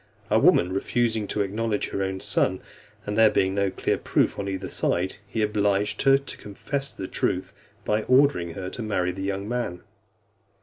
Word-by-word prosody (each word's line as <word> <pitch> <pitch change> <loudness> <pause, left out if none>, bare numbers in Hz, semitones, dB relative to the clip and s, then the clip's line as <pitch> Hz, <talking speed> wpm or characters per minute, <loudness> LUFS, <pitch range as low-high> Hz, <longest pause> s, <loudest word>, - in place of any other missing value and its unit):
A - - +5
woman 90 +1 +4
refusing 110 +1 0
to 105 - -1
acknowledge 105 +2 -2
her 100 - -3
own 95 -1 -2
son, 100 -2 0 0.4
and 105 - -3
there 110 0 +6
being 95 -2 +1
no 100 0 +1
clear - - -1
proof - - +1
on 100 -1 -3
either 95 0 -4
side, 90 +2 -1
he 110 +1 -1
obliged 105 -1 +1
her 135 0 +6
to 140 -1 -8
confess 135 +7 -4
the 95 - -6
truth, - - -1 0.3
by 105 +1 +1
ordering 130 - +3
her 95 -2 -5
to - - -6
marry 95 -5 0
the 95 +2 -7
young 100 +1 -3
man. 120 -7 -3
100 Hz, 180 wpm, -25 LUFS, 95-110 Hz, 0.4 s, there